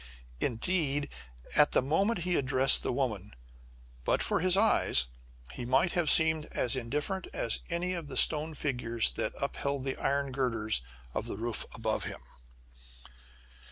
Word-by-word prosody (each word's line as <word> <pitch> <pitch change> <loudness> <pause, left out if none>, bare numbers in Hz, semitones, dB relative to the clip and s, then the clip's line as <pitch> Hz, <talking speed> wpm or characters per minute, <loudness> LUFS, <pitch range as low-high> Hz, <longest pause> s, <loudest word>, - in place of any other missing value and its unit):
Indeed, 145 - -1 0.5
at 150 -1 +5
the - - +4
moment 185 - 0
he 180 +1 0
addressed 130 0 +4
the - - -2
woman, 110 - -3 0.7
but - - +1
for - - +1
his 185 +2 +3
eyes, 200 - +3 0.5
he 125 - -7
might 130 +8 +2
have 170 -4 +1
seemed 160 -1 +4
as 125 - +1
indifferent 150 +10 -3
as 115 - -1
any 180 +2 -2
of 170 -4 -5
the 135 - -5
stone 155 0 +4
figures 120 - +1
that - - -3
upheld 140 -1 -3
the 135 -1 -3
iron 140 0 -1
girders 115 - 0 0.3
of - - -3
the - - -5
roof 115 +1 -3
above 110 -1 -2
him! - - -7
140 Hz, 150 wpm, -30 LUFS, 120-160 Hz, 0.7 s, at